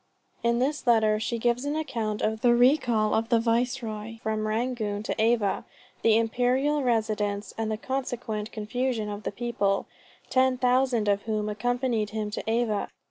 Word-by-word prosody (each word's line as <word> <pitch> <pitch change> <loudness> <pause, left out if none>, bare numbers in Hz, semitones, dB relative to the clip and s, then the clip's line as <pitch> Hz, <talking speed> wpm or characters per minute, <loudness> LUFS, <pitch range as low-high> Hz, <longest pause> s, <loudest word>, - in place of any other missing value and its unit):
In 235 0 +2
this 275 +3 -1
letter 220 -2 +4
she 235 +2 -2
gives 240 +2 +1
an 290 +1 -2
account 230 -9 -2
of 220 0 0
the 240 -1 +5
recall 240 -4 +3
of 225 +1 0
the 235 -2 +4
Viceroy 230 -2 -1
from 215 0 -1
Rangoon 215 -2 -1
to 220 - -2
Ava, 225 -3 +2 0.4
the 225 -1 +5
imperial 250 +6 +1
residence, 215 -4 -1
and 220 -1 -2
the 215 - -1
consequent 235 -4 -3
confusion 225 0 -2
of 205 0 -5
the - - -3
people, 205 -3 -1 0.5
ten 260 0 +3
thousand 250 -3 +2
of 200 0 +2
whom 215 -1 0
accompanied 240 0 -1
him 215 -1 -3
to - - -4
Ava. 225 -3 0
230 Hz, 160 wpm, -27 LUFS, 215-245 Hz, 0.5 s, the